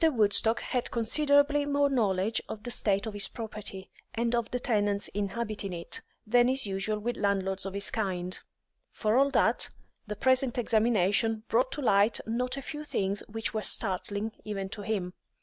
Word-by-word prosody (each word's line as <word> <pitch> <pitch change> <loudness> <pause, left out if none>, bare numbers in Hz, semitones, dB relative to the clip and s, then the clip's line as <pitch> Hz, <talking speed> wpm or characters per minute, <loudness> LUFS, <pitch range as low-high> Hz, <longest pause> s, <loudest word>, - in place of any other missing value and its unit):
Woodstock 225 0 +4
had 250 -2 -2
considerably 285 +5 +3
more 285 0 +2
knowledge 215 -5 +1
of 210 - -7
the 245 - -5
state 200 -3 0
of 220 - -5
his 205 -1 +1
property, 210 -4 -7 0.2
and 235 +1 0
of 235 -1 0
the 250 - -2
tenants 205 -5 0
inhabiting 205 -1 -3
it, 170 -1 -3 0.2
than 240 +3 +4
is 265 -1 +2
usual 200 +2 -1
with 235 +3 -3
landlords 195 -1 0
of 195 - -6
his 200 - +1
kind; 185 -4 -2 0.5
for 215 0 0
all 275 +2 +4
that, - - +3 0.4
the 210 - -4
present 260 +2 +2
examination 220 -1 +2
brought 255 +3 +2
to 290 - -5
light 205 -1 +4
not 250 +4 -2
a 275 - -5
few 300 +2 -6
things 200 -8 -1
which 225 0 -3
were 215 - -1
startling 205 +1 -1
even 195 -2 -4
to 210 +1 -6
him. 195 -4 -2
220 Hz, 170 wpm, -29 LUFS, 200-245 Hz, 0.5 s, Woodstock